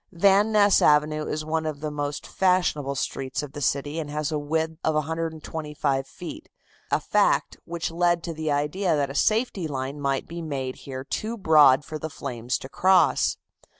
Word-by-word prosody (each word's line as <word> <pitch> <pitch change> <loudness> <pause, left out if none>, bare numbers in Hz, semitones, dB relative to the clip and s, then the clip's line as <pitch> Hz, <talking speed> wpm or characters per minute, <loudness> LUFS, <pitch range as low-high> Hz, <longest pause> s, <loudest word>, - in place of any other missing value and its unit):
Van 200 +4 +4
Ness 205 -2 +5
Avenue 150 +1 +3
is 155 0 -3
one 160 +1 -1
of 155 -2 -4
the 155 0 -4
most 145 -1 -4
fashionable 175 -7 +1
streets 135 +1 -3
of 145 - -7
the 145 - -7
city 145 +3 -1
and 150 -2 -4
has 150 0 -2
a 155 - -1
width 160 +2 -2
of 155 - +1
125 155 -3 -2
feet, 305 - -9 0.4
a - - +2
fact - - +1
which 170 -1 -4
led 175 0 +1
to 170 - -4
the 155 -1 -2
idea 155 +5 0
that 140 -2 0
a - - -7
safety 215 - +1
line 135 0 -4
might 135 -1 -1
be 170 +1 -6
made 135 -5 -4
here 130 -1 -7
too 220 +11 -4
broad 150 -7 +5
for 155 -1 -6
the 160 - -4
flames 120 -3 -3
to - - -9
cross. 180 +2 +3
155 Hz, 185 wpm, -25 LUFS, 145-170 Hz, 0.4 s, Ness